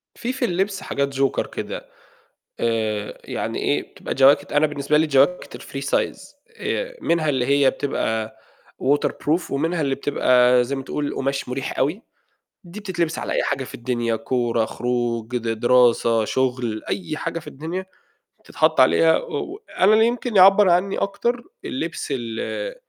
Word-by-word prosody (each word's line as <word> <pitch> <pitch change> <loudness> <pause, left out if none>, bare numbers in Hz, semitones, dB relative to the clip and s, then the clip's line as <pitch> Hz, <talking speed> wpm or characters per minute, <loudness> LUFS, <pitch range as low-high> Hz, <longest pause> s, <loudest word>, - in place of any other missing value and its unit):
في 250 +2 -3
في 260 -2 -1
اللبس 195 0 -1
حاجات 140 0 -2
Joker 135 0 +1
كده - - -6 0.7
آآ، 110 -2 -1
يعني - - -4
إيه، - - +1
بتبقى - - -5
جواكت 135 +1 +4
أنا 150 +1 +3
بالنسبة 150 0 0
لي 160 +1 +2
جواكت 140 +5 +2
الfree 135 - -7
size - - 0 0.4
آآ، - - -3
منها 165 -2 +1
اللي 130 -3 +1
هي 140 0 +4
بتبقى 110 -6 -2 0.5
waterproof 145 +4 0
ومنها 160 +5 0
اللي 135 -2 0
بتبقى 125 -3 +3
زي 135 +3 -3
ما 135 - -5
تقول 145 +1 -3
قُماش 135 -1 -2
مُريح 130 +2 -4
أوي، 155 - 0 0.6
دي 180 +3 -9
بتتلبس 175 -5 -2
على - - -3
أي - - +1
حاجة 135 - -1
في - - -9
الدنيا 120 -1 -1
كورة، 120 -1 0
خروج، 120 0 -2
د 115 -1 -5
دراسة، 120 -2 +4
شُغل 125 -3 -1
أي 165 -5 -3
حاجة 165 +1 -3
في - - -15
الدنيا، 165 +7 -5 0.6
بتتحَط - - +1
عليها - - +5
و - - -5
و - - -10 0.2
أنا 190 +3 +5
اللي 220 +1 +5
يمكن 240 -2 -2
يعبّر 195 +1 +7
عنّي 180 +3 +2
أكتر 235 +5 -1 0.2
اللبس 165 +5 -4
ال 120 - -4
140 Hz, 155 wpm, -22 LUFS, 125-175 Hz, 0.7 s, يعبّر